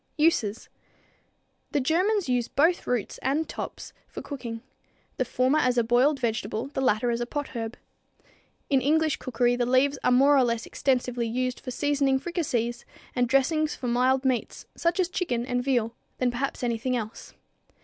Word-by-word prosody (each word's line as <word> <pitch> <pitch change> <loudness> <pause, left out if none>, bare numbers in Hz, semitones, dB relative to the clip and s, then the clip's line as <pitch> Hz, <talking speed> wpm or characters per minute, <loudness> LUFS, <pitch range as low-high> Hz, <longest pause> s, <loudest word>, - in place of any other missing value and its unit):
Uses. 250 -9 +1 1.1
The 290 - +3
Germans 365 +8 +1
use 245 -2 +1
both 330 +5 +2
roots 245 -4 -2
and 290 +4 0
tops - - -7
for - - -8
cooking; 235 -5 -6 0.5
the 255 - +1
former 255 +5 +2
as 250 -3 +2
a 235 - +4
boiled 250 +5 +3
vegetable, 225 +1 -2
the 275 - -3
latter 240 -1 +2
as 235 0 -1
a 240 - -2
potherb. 240 -5 -4 0.9
In 270 -3 +3
English 310 +2 +2
cookery 245 -1 +1
the 245 -1 0
leaves 270 +3 +3
are - - +3
more 275 +3 +5
extensively 245 0 0
used 255 +2 -2
for 255 - -8
seasoning 280 0 +1
fricassees 250 -7 -2 0.3
and 245 -1 +1
dressings 300 +4 +2
for 250 - -5
mild 255 +2 +2
meats, 255 -3 -1
such 340 +2 0
as 365 - +3
chicken 255 -10 -2
and 245 -1 -1
veal, 240 -4 +1 0.2
than 250 -1 +1
perhaps 255 +2 -3
anything 245 +1 0
else. 220 -1 -7
255 Hz, 160 wpm, -26 LUFS, 240-285 Hz, 1.1 s, more